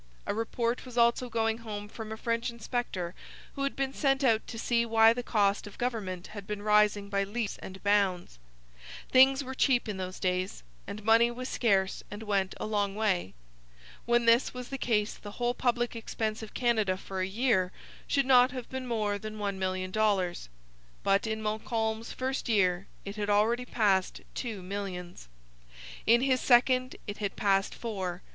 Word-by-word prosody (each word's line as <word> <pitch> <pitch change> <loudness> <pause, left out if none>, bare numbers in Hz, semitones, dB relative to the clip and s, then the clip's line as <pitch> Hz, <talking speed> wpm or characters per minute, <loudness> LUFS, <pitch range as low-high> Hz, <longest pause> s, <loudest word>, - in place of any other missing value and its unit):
A - - -1
report 230 +2 -1
was 250 -2 -10
also 235 +1 +3
going 225 0 0
home 210 -3 -6
from 220 +1 -8
a 220 - -5
French 230 +2 -1
inspector 235 -6 -3 0.4
who 275 - -6
had 275 0 -1
been 270 0 -2
sent 275 -1 +1
out 225 -4 +3
to 230 - -7
see 235 +1 +1
why 225 -1 +5
the 245 - -3
cost 205 -3 +1
of 205 - -12
government 205 -8 -3
had 200 -2 -8
been 210 -1 -4
rising 210 -1 +3
by 200 0 0
leaps 210 +1 -3
and 190 0 -10
bounds. 195 - +1 0.7
Things 265 +2 +6
were 265 0 -6
cheap 255 -2 +2
in 210 -3 -3
those 185 0 -5
days, 185 - -1 0.2
and 210 +1 -7
money 225 +2 +5
was 255 +2 -5
scarce 195 -5 +1
and 205 +2 -7
went 195 -3 0
a - - -3
long 205 -2 0
way. 195 - 0 0.7
When 240 0 +3
this 230 +2 +4
was 250 -1 -6
the 270 - -5
case 210 -4 +1
the 205 -1 -10
whole 245 0 0
public 240 -1 0
expense 220 -1 -3
of 220 - -10
Canada 220 -6 +1
for 190 0 -5
a 185 - 0
year 195 -3 +1 0.4
should 275 -1 +2
not 255 -1 +6
have 255 -2 -6
been 260 -1 -4
more 210 -3 -1
than 215 +1 -7
one 200 -2 -3
million 185 0 -2
dollars. 195 - 0 0.5
But 195 +2 +2
in 220 0 -3
Montcalm's 220 +1 -2
first 260 -1 -3
year 185 -3 +2 0.2
it 200 +1 -6
had 210 0 -2
already 225 +4 +2
passed 200 -6 +1
two 220 -7 -5
millions. 180 - -6 0.8
In 235 +2 +6
his 260 -1 +2
second 255 +1 +4
it 205 - -6
had 200 -2 -2
passed 195 -1 +1
four. 190 -6 -4
220 Hz, 180 wpm, -29 LUFS, 200-240 Hz, 0.8 s, Things